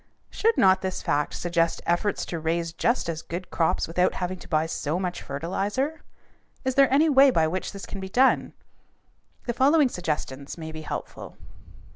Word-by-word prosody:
Should 455 +1 +1
not 190 -1 +5
this 190 -1 -3
fact 150 0 0
suggest 170 -1 0
efforts 175 +4 0
to 170 - -4
raise 165 +1 -1
just 235 +4 0
as 165 -1 -3
good 175 +3 -7
crops 165 - +1
without 180 +3 +1
having 180 0 -3
to - - -12
buy 155 -1 +1
so 160 0 -2
much 180 -2 -3
fertilizer? 200 - -2 0.6
Is 260 - +1
there 275 -1 +4
any 295 +4 +4
way 275 -2 +6
by 165 -11 +3
which 185 +3 -3
this 200 - -8
can 195 - -7
be 190 0 -6
done? 260 +6 +3 0.9
The 240 - -1
following 280 +3 +4
suggestions 150 - -4
may 160 -1 -6
be 155 0 -7
helpful. 155 - -7
180 Hz, 175 wpm, -25 LUFS, 165-245 Hz, 0.9 s, way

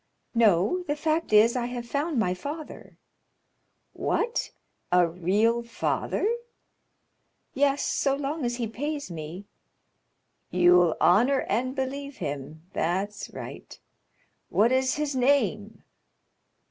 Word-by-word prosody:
"No; 220 - +3
the 295 - 0
fact 315 0 -1
is, 215 +3 +6
I 240 -1 -1
have 245 -1 -5
found 290 +3 -1
my 180 -5 +2
father." 290 - -8 1.0
"What? 465 +2 -1 0.4
a 180 -1 +5
real 200 +8 +1
father?" 235 - -1 1.3
"Yes, 280 +1 +2
so 275 -1 +1
long 285 +2 -3
as 240 0 -1
he 240 -1 -2
pays 285 - -4
me——" 165 +4 -7 1.0
"You'll 175 -2 +4
honor 245 +9 +4
and 255 +5 -1
believe 280 +1 -4
him—that's 160 +7 -3
right. - - -9 0.7
What 225 +4 +3
is 260 +1 +2
his 295 -2 -2
name?" 220 -5 +1
235 Hz, 110 wpm, -26 LUFS, 185-280 Hz, 1.3 s, is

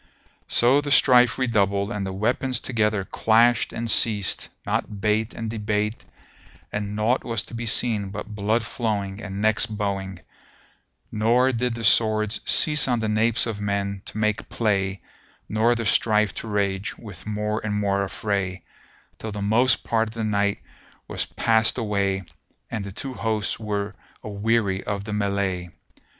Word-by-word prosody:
So 130 +4 +4
the 145 - -5
strife 125 -3 +5
redoubled 100 -5 +1
and 105 -3 -3
the - - -4
weapons 120 +6 -1
together 105 -5 0
clashed 115 +4 +3
and 115 - -4
ceased 105 -3 +2 0.2
not 105 - -2
bate 105 +2 0
and 115 - -4
debate 105 0 -2 0.7
and 105 0 -3
naught 110 +4 +1
was 115 -3 -1
to - - -13
be 115 0 -4
seen 105 -3 +2
but 105 +2 -6
blood 110 +3 0
flowing 105 -3 -3
and 100 0 -5
necks 110 0 +4
bowing; 100 -3 -3 0.9
nor 120 +5 +3
did 125 -1 -1
the 115 - -6
swords 110 0 +3
cease 150 -3 +5
on 120 -2 +1
the 110 - -1
napes 110 +2 +2
of 110 -3 -4
men 100 -1 -2
to - - -7
make 105 -1 -1
play 100 -3 -1 0.4
nor 110 +3 +2
the 115 -1 -3
strife 105 -1 +2
to - - -7
rage 100 -1 -2
with 105 -4 -11
more 105 0 -2
and 105 -1 -2
more 100 -1 +1
affray, 95 -2 -3 0.6
till 110 - -5
the 105 - -5
most 110 +6 +3
part 115 -1 0
of 110 - -13
the 115 - -3
night 100 -1 +1 0.5
was - - -2
past 110 0 +2
away 100 -4 -1 0.5
and 110 -4 -3
the 100 - -7
two 130 +7 -3
hosts 110 -4 -1
were 105 -1 -3 0.3
aweary 105 -2 0
of 100 -1 -3
the 105 0 -5
mellay. 100 -3 -1
105 Hz, 160 wpm, -24 LUFS, 100-115 Hz, 0.9 s, strife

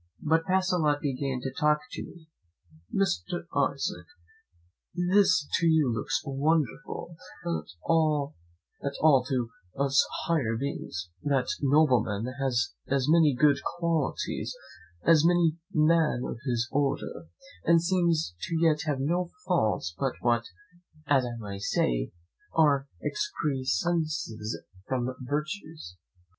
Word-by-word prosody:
But 160 +1 +2
Pacolet 180 -5 +2
began 135 -2 -2
to 135 +1 -4
talk 150 0 +3
to - - -5
me. 165 -3 -13 0.6
"Mr. 175 - -1 0.3
Isaac, 175 +7 -4 0.9
this 185 -2 +3
to 170 - +2
you 155 -6 +3
looks 105 -2 -1
wonderful, 155 +3 -1 0.3
but - - -2 0.4
not 155 -3 +2 0.5
at 140 0 -2
all 140 -5 +6
to 125 -3 -1 0.3
us 140 0 +4 0.2
higher 130 -10 +1
beings: 90 -10 -4
that 135 -3 +1 0.2
nobleman 130 -6 +2
has 120 -6 0
as 135 -2 +1
many 155 -3 +5
good 145 +3 +4 0.2
qualities 160 -8 -1 0.5
as 165 -2 +5
any 170 -2 +3
man 155 -4 +3
of 115 - -5
his 120 -1 0
order, 135 - -1 0.4
and 165 0 +6
seems 170 - +1
to 165 -1 +2
have 145 -3 0
no 170 +6 0 0.2
faults 110 - +1
but 135 -2 0
what, 120 -1 +2 0.6
as 135 -3 +3
I 120 -1 -5
may 100 -3 -6
say, - - 0 0.4
are 145 -3 +4 0.2
excrescences 145 - -1 0.3
from 130 -1 -1
virtues. 150 - -4
145 Hz, 115 wpm, -28 LUFS, 125-165 Hz, 0.9 s, all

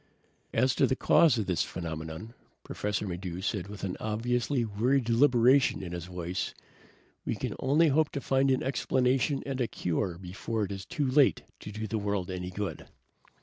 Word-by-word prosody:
"As 130 +3 +2
to - - +3
the 130 - +1
cause 150 -1 +5
of 110 - 0
this 90 -5 0
phenomenon," 80 +5 -5 0.3
Professor 105 0 -3
Maddox 90 +1 -5
said 100 -5 -2
with 100 0 -9
an 95 -2 -3
obviously 120 +4 0
weary 115 +6 +2
deliberation 125 0 +4
in 90 - -6
his 85 -1 -5
voice, 90 0 -4 0.7
"we - - -2
can - - -3
only 150 +5 +4
hope 150 +2 +3
to 140 - -2
find 135 0 +2
an 130 -1 +2
explanation 130 +1 +1
and 135 -2 -3
a 120 - +1
cure 90 -1 -2
before 95 +5 -3
it 100 - -3
is 95 -1 -6
too 145 - -1
late 135 +1 +4 0.2
to 105 - -8
do 110 +1 -4
the 110 +1 -2
world 100 -3 -2
any 90 0 -4
good." 100 +2 -5
110 Hz, 180 wpm, -29 LUFS, 95-130 Hz, 0.7 s, cause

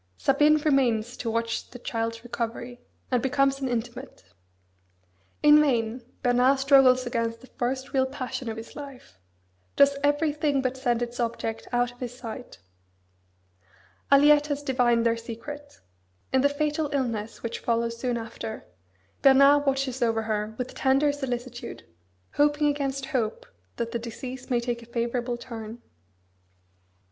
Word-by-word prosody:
Sabine 295 +3 +4
remains 250 -6 +1
to 230 - -3
watch 230 0 -2
the 245 - -10
child's 230 -1 -3
recovery, 240 +1 -5 0.3
and 250 -2 +2
becomes 275 0 +1
an 265 - -1
intimate. 240 - -5 1.2
In 300 0 +8
vain 240 -4 0 0.2
Bernard 250 +2 +4
struggles 270 -2 +5
against 230 -1 -2
the - - -13
first 260 +1 -3
real 265 -1 +2
passion 255 -2 -5
of 220 - -5
his 225 - -9
life; 275 - -10 0.6
does 280 0 +5
everything 290 -1 +1
but 260 -1 -1
send 245 -2 0
its 240 +1 -6
object 230 -1 -3
out 245 0 +1
of 245 - -21
his 245 -1 -6
sight. 245 +1 -8 1.5
Aliette 295 +1 +6
has 290 -1 -3
divined 245 -4 +2
their 230 0 +3
secret. 285 +6 -9 0.5
In 260 - +4
the 285 - +4
fatal 300 +1 -1
illness 230 -6 -2
which 230 0 -4
follows 230 0 0
soon 240 0 -2
after, 225 -1 -7 0.6
Bernard 275 +1 +6
watches 270 -1 0
over 225 -1 +1
her 215 0 -2
with 250 0 -4
tender 275 +2 +3
solicitude; 250 -3 -5 0.5
hoping 295 +1 +3
against 275 -2 -1
hope 245 -6 -2 0.3
that 230 0 -3
the 235 - -2
disease 250 +2 -7
may 245 -2 +2
take 235 0 -3
a 230 - -14
favourable 240 +1 -2
turn. 230 -2 -8
250 Hz, 140 wpm, -26 LUFS, 235-275 Hz, 1.5 s, In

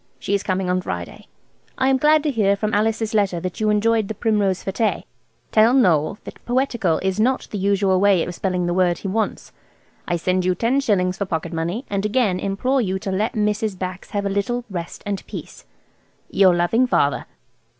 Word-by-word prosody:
She 200 - -3
is 200 - +2
coming 185 -1 -1
on 180 0 +1
Friday. 85 - -6 0.5
I 260 - +1
am 265 - +3
glad 300 +2 +4
to 300 - +1
hear 205 -5 +2
from 215 +2 -2
Alice's 220 +1 0
letter 200 -5 +1
that 185 0 -5
you 215 -1 +1
enjoyed 215 0 +2
the 220 - -5
Primrose 205 -4 0
fête. 215 +3 -1 0.5
Tell 225 +3 +5
Noël 180 - +3
that - - -11
'poetticle' 240 -9 0
is 190 +1 -1
not 255 +4 +1
the 205 - -3
usual 195 -1 +2
way 195 -3 +4
of 180 - -5
spelling 180 0 -1
the 175 - 0
word 175 -1 +2
he - - -6
wants. 215 +3 -2 0.6
I 175 - 0
send 185 +2 0
you 180 0 +1
ten 235 +8 +1
shillings 185 -8 +1
for 200 - 0
pocket 170 -1 -3
money, 170 +10 -3
and 200 -1 -2
again 210 -4 +1
implore 250 +8 0
you 190 -4 -1
to 190 0 -4
let 210 +5 -1
Mrs. 210 -2 -1
Bax 185 0 -6
have 205 -1 -2
a - - 0
little 235 +5 -1
rest 175 -2 -6
and 200 -1 -3
peace. - - -9 0.7
"Your 185 -3 +5
loving 225 +9 +2
"FATHER." 145 -11 +1
200 Hz, 200 wpm, -21 LUFS, 185-220 Hz, 0.7 s, Tell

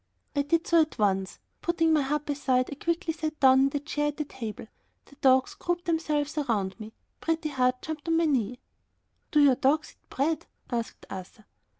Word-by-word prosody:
I 285 - +3
did 330 +4 +1
so 335 -1 +5
at 310 -3 -2
once. 195 -3 0 0.2
Putting 330 -2 +2
my 305 - +4
harp 295 +2 -1
aside 260 -3 +1
I 280 - -8
quickly 335 0 0
sat 310 -1 -4
down 265 -1 +6
in 270 +1 +4
the 285 - -2
chair 295 0 -1
at 295 - -3
the 300 - -2
table; 225 -7 -7 0.4
the 280 - -18
dogs 260 -1 +4
grouped 350 0 -3
themselves 305 -3 0
around 210 -8 -1
me. 220 0 -9 0.3
Pretty 325 -1 -1
Heart 255 -2 +1
jumped 315 0 -6
on 330 0 +3
my 335 - +3
knee. 250 -6 0 0.7
"Do 300 - +4
your 280 -2 +7
dogs 285 +4 +1
eat - - -43
bread?" 315 +4 -1 0.2
asked 235 -2 -3
Arthur. 195 +4 -9
290 Hz, 195 wpm, -28 LUFS, 255-315 Hz, 0.7 s, your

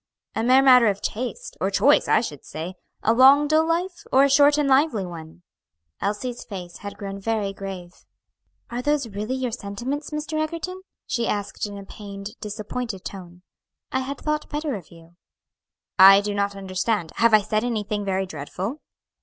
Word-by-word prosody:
"A - - -1
mere 255 +3 +5
matter 250 -3 +7
of 200 -1 +1
taste, 240 -1 -4
or 190 - +2
choice, 280 +8 +4
I - - +4
should 145 - -6
say 165 +4 -6 0.3
a 225 - +4
long 270 +4 +7
dull 315 +2 +3
life, 350 +2 -1
or 265 +1 +6
a 280 - +4
short 290 +1 +6
and 295 -2 +1
lively 265 -7 +3
one." 165 0 -10 0.6
Elsie's 225 +5 -3
face 180 -4 -8
had 200 -1 -8
grown 200 -1 -6
very 205 -1 -1
grave. 190 -3 -7 0.8
"Are 240 +1 -3
those 290 -1 0
really 210 +5 -3
your 255 -2 -2
sentiments, 245 +7 -4
Mr. 310 +1 -3
Egerton?" 335 +4 -4 0.2
she 235 -2 -1
asked, 205 0 -2
in 205 0 -8
a 200 - -9
pained, 200 0 -8
disappointed 215 0 -5
tone. 180 -2 -9 0.5
"I 260 - +1
had 270 +2 -4
thought 300 0 -2
better 295 -1 -2
of 190 -8 -7
you." 165 0 -17 0.8
"I 195 +1 +10
do 205 0 -3
not 200 0 -1
understand; 190 -1 -2
have 230 -1 +5
I 215 - +5
said 215 +1 -1
anything 210 -3 -2
very 190 -1 -1
dreadful?" 185 - -5
215 Hz, 175 wpm, -24 LUFS, 195-270 Hz, 0.8 s, I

